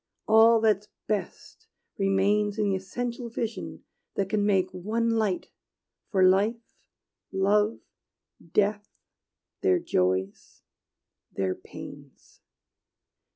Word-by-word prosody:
All 225 +1 +6
that's 210 -2 +2 0.2
best 215 - -5 0.3
remains 200 +2 +2
In 210 -1 +1
the - - +1
essential 235 +5 -4
vision 230 0 -5 0.3
that 195 -1 -1
can 205 0 +1
make 190 -3 +2
One 220 +6 -1
light 215 -5 -1 0.6
for 190 -2 +2
life, 215 +5 +1 0.6
love, 205 +3 +2 0.7
death, 205 +1 +1 0.7
their 380 -1 +3
joys, 95 - -1 0.7
their 95 -1 -1
pains. - - -13
205 Hz, 95 wpm, -27 LUFS, 190-225 Hz, 0.7 s, All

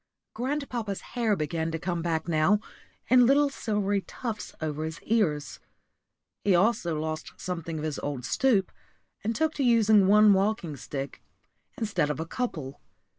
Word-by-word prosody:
Grandpapa's 245 -5 -3
hair 230 -4 +2
began 160 0 -2
to 165 - -2
come 175 0 -2
back 165 -1 -1
now, 170 +5 +3 0.5
in 250 0 +6
little 280 +1 +4
silvery 205 -5 -1
tufts 220 +1 -6
over 155 -1 -3
his 160 +1 -5
ears. 160 - 0 0.8
He 195 -3 +4
also 175 -5 +2
lost 155 0 -4
something 165 -3 -4
of 150 - -4
his 155 -2 -3
old 140 -4 -4
stoop, 220 - +2 0.5
and 225 +2 -1
took 315 +3 +1
to 280 - -1
using 220 -5 +5
one 210 +1 +7
walking 195 -5 0
stick 140 +1 -6 0.6
instead 195 -10 0
of 150 - -2
a 160 - -2
couple. 155 - -4
190 Hz, 150 wpm, -27 LUFS, 160-225 Hz, 0.8 s, one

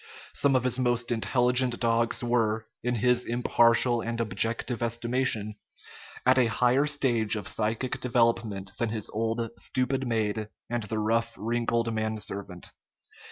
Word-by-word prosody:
Some 140 -2 +2
of 130 - +2
his 130 0 +1
most 120 -2 0
intelligent 125 +1 +2
dogs 115 0 +1
were, 115 -2 +1 0.2
in 125 +1 -1
his 125 +2 +2
impartial 120 0 +3
and 115 0 -4
objective 115 +3 -1
estimation, 115 -2 -1 0.7
at 130 +1 +5
a 125 - +4
higher 125 +5 +2
stage 120 -7 +1
of 105 - -5
psychic 115 +4 -1
development 115 -6 0
than 120 - 0
his 110 -2 -2
old, 115 +1 -1
stupid 130 +1 -1
maid 110 -2 -1 0.2
and 120 -1 0
the 110 +1 -4
rough, 115 +2 0
wrinkled 115 0 -1
man 110 0 -2
servant. 100 -4 -7
115 Hz, 140 wpm, -27 LUFS, 110-125 Hz, 0.7 s, at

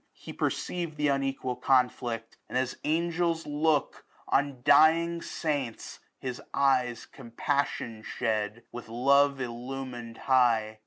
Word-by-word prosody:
He - - -10
perceiv'd 170 -4 -2
Th' 150 0 +2
unequal 135 -2 -2
conflict, 125 -3 0
and - - -1
as 130 0 -1
angels 170 +1 0
look 150 0 0 0.3
On 140 -3 0
dying 165 +4 +5
saints, 145 -10 -3 0.2
his 125 -2 -5
eyes 130 -4 +2
compaflTion 120 -2 -3
shed. 110 0 -2
With 120 -1 -8
love 140 +4 +4
illumin'd 120 -1 -6
high. 115 -5 +3
130 Hz, 110 wpm, -28 LUFS, 120-150 Hz, 0.3 s, dying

